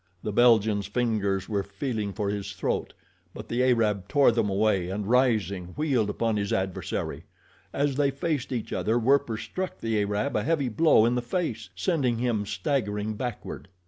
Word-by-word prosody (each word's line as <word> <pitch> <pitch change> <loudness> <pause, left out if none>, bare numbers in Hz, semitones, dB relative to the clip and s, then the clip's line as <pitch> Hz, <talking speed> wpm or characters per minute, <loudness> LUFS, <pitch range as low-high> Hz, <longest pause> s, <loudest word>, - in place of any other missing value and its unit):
The 105 - -2
Belgian's 110 -3 +4
fingers 100 -4 0
were 105 -3 0
feeling 100 +1 -3
for 100 0 -2
his 100 -1 -4
throat, 95 - -2 0.4
but - - -8
the 120 +2 0
Arab 110 -6 +2
tore 140 -3 +5
them 115 -3 0
away, 95 -3 +1
and 100 +2 -3
rising 105 -7 +1
wheeled 135 -9 +1
upon 115 +1 0
his 100 -1 -2
adversary. 95 -1 -2 0.5
As 140 -1 0
they 145 -1 +3
faced 140 -1 -2
each 120 -4 -3
other 110 +2 +1
Werper 125 -1 +2
struck 185 +10 -5
the 115 -2 0
Arab 105 +1 -1
a 105 - +2
heavy 145 -1 0
blow 120 -2 +4
in 120 - +2
the 125 - 0
face, 120 - -3
sending 125 - 0
him 115 -4 -1
staggering 105 0 -1
backward. 120 -3 -5
110 Hz, 170 wpm, -27 LUFS, 100-125 Hz, 0.5 s, tore